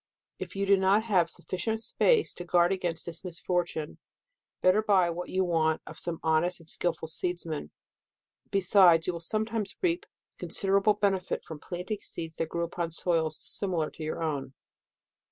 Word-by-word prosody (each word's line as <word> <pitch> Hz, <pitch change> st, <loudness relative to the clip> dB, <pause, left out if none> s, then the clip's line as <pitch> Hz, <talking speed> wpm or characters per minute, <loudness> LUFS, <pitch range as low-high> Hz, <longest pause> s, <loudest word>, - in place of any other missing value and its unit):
If -, -, -6 dB
you 200 Hz, 0 st, 0 dB
have 195 Hz, 0 st, +4 dB
not 190 Hz, -2 st, +3 dB
sufficient 220 Hz, +7 st, -3 dB
space 440 Hz, -, +2 dB
to 175 Hz, -, -7 dB
guard 175 Hz, 0 st, +3 dB
202 -, -, +3 dB
DECEMBER. 185 Hz, -2 st, -1 dB
against 165 Hz, -, -5 dB
this 170 Hz, 0 st, -6 dB
misfortune, 175 Hz, -3 st, -3 dB, 0.6 s
better 185 Hz, +4 st, +4 dB
buy 190 Hz, -5 st, +3 dB
what 175 Hz, +1 st, -5 dB
you 190 Hz, 0 st, +1 dB
may 180 Hz, -, -3 dB
want, 160 Hz, -2 st, +1 dB
of -, -, -10 dB
some 170 Hz, -2 st, -4 dB
honest 165 Hz, +3 st, +1 dB
and 165 Hz, -, -17 dB
skilful 165 Hz, -1 st, -2 dB
seeds 175 Hz, +2 st, -1 dB
man. 155 Hz, -, -5 dB, 0.8 s
Besides, 185 Hz, -4 st, +5 dB
you 180 Hz, -, 0 dB
will 170 Hz, -, -5 dB
sometimes 215 Hz, +3 st, -1 dB
reap 345 Hz, -1 st, 0 dB, 0.3 s
con -, -, -6 dB
siderable 200 Hz, +1 st, +3 dB
benefit 195 Hz, -3 st, 0 dB
from 160 Hz, -2 st, -9 dB
planting 180 Hz, +6 st, -5 dB
seeds 165 Hz, -4 st, -6 dB
that 165 Hz, -, -2 dB
grew 170 Hz, +1 st, -2 dB
upon 170 Hz, 0 st, -3 dB
soils 165 Hz, -2 st, 0 dB
dissimilar 175 Hz, -6 st, 0 dB
to 160 Hz, -, -9 dB
your 155 Hz, +1 st, -3 dB
own. 140 Hz, -4 st, -3 dB
175 Hz, 175 wpm, -29 LUFS, 165-195 Hz, 0.8 s, Besides